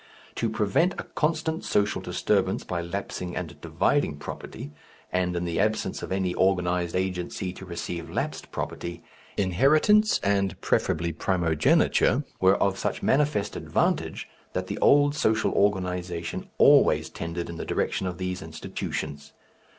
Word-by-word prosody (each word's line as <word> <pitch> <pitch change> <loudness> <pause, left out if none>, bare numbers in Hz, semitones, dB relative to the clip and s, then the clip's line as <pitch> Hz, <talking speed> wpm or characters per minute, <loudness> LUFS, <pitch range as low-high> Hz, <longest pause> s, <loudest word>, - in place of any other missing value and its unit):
To 115 - -1
prevent 110 - +2
a - - -3
constant 160 +1 -1
social 105 0 +1
disturbance - - 0
by 85 -1 -3
lapsing 90 0 -5
and - - -6
dividing 75 - +1
property, 70 0 -8 0.4
and 90 -1 +1
in 85 0 -1
the 85 -1 -2
absence 110 +2 0
of - - -6
any 95 -2 0
organized 90 -2 +1
agency 90 0 -2
to 95 - -10
receive 85 -1 -5
lapsed - - -3
property, 85 0 -5 0.3
inheritance 150 - +4
and 100 -1 +1
preferably 85 +1 0
primogeniture 80 -3 +2 0.2
were 95 +1 +5
of 95 -1 +1
such - - -2
manifest 140 -7 +1
advantage - - -1 0.3
that 90 - -2
the 100 +2 -5
old 145 0 +5
social 110 -7 +1
organization 90 -4 -1
always - - +5
tended 85 +1 -4
in 85 - -7
the - - -4
direction 95 - -1
of 90 -1 -4
these 90 0 -3
institutions. 75 -2 -5
95 Hz, 135 wpm, -26 LUFS, 85-105 Hz, 0.4 s, were